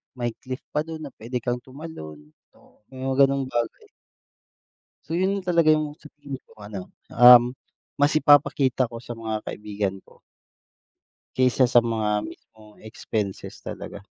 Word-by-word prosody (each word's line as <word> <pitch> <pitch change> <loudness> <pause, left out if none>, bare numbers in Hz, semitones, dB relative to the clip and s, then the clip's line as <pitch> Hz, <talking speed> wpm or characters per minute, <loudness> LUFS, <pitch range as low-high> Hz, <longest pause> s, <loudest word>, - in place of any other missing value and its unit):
may 120 -2 -2
cliff 130 0 -7
pa - - 0
dun 160 -1 -8
na 140 - -7
pwede 120 +3 -3
kang 120 0 -1
tumalon, 80 - -10 0.6
may 130 0 -8
mga 135 +1 +4
ganong 135 -1 -1
bagay. 120 -1 -3 1.1
So 165 +2 -2
yun 195 +2 +1
talaga 170 -4 +4
yung 155 -1 -2
sa - - -26 0.2
tingin 140 -2 -6
ko - - -21
ano 100 -3 -8 0.2
um, 125 +1 +7 0.4
mas 145 +1 +3
ipapakita 140 -4 +4
ko 115 0 -9
sa 120 -1 -8
mga 110 -1 -3
kaibigan 105 -2 -3
ko. - - -22 1.2
Kaysa 130 0 +3
sa 120 0 +5
mga 110 -3 -1
mismong 110 -2 -15
expenses 110 -2 -5
talaga. - - -8
125 Hz, 145 wpm, -24 LUFS, 110-145 Hz, 1.2 s, um